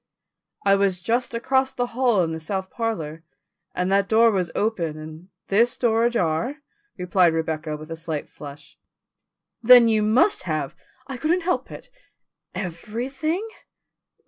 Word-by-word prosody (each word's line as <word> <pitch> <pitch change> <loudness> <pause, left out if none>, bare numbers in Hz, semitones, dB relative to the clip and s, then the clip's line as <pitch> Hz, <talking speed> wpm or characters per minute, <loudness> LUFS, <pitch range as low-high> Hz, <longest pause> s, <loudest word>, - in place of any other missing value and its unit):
"I 195 - +5
was 195 -2 +2
just 235 +5 -1
across 265 +2 0
the 245 - 0
hall 240 -6 +2
in 165 - -2
the 160 - -4
south 190 +3 -4
parlour, 165 -9 -4 0.5
and 180 +1 -1
that 195 0 +2
door 225 +1 +5
was 185 -4 -1
open 175 -8 -1
and 155 +3 -10 0.2
this 230 +5 +2
door 230 -1 +2
ajar," 235 - 0 0.4
replied 180 -2 +2
Rebecca 160 -1 -3
with 155 +2 -11
a - - -3
slight 160 -2 -5
flush. 145 0 -12 0.8
"Then 240 0 +8
you 220 -1 +2
must 220 - +3
have 155 -3 -2 0.2
" 260 - -34
"I 265 -1 -6
couldn't 335 +6 +1
help 360 +1 -1
it." - - -11 0.6
"Everything?" 245 - -4
200 Hz, 145 wpm, -23 LUFS, 165-240 Hz, 0.8 s, Then